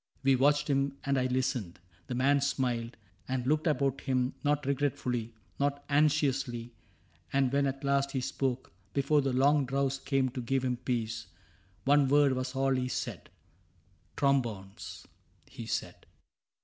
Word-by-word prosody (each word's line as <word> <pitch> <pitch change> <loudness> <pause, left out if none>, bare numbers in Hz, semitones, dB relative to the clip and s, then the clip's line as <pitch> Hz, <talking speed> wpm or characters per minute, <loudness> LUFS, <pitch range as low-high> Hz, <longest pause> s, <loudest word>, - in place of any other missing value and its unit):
We 135 0 +5
watched 145 +3 +3
him, 140 -1 0
and 140 0 +1
I 130 -1 +2
listened. 125 -8 -1 0.3
The 125 - -3
man 140 +3 +3
smiled 125 -4 -1 0.3
And 130 -1 -2
looked 155 +4 +1
about 140 -3 +1
him 130 -1 0
— - - -32
not 145 -1 +1
regretfully, 125 -5 -1 0.2
Not 140 0 0
anxiously; 140 -5 +1 0.6
and 135 -1 +2
when 140 0 +3
at 135 +1 -4
last 140 0 +2
he 135 - -2
spoke. 130 0 -2 0.2
Before 140 +2 +3
the 135 -1 0
long 140 +3 +4
drowse 135 0 0
came 135 -1 +1
to 125 +1 -5
give 130 +2 0
him 125 -1 0
peace. 115 -3 -3 0.6
One 145 0 +5
word 145 0 +4
was 130 0 -3
all 135 0 +2
he 130 -1 0
said. 125 - -4 0.4
" - - -36
Trombones," 110 -8 -1 0.4
he - - -9
said. - - -4
135 Hz, 155 wpm, -30 LUFS, 125-140 Hz, 0.6 s, We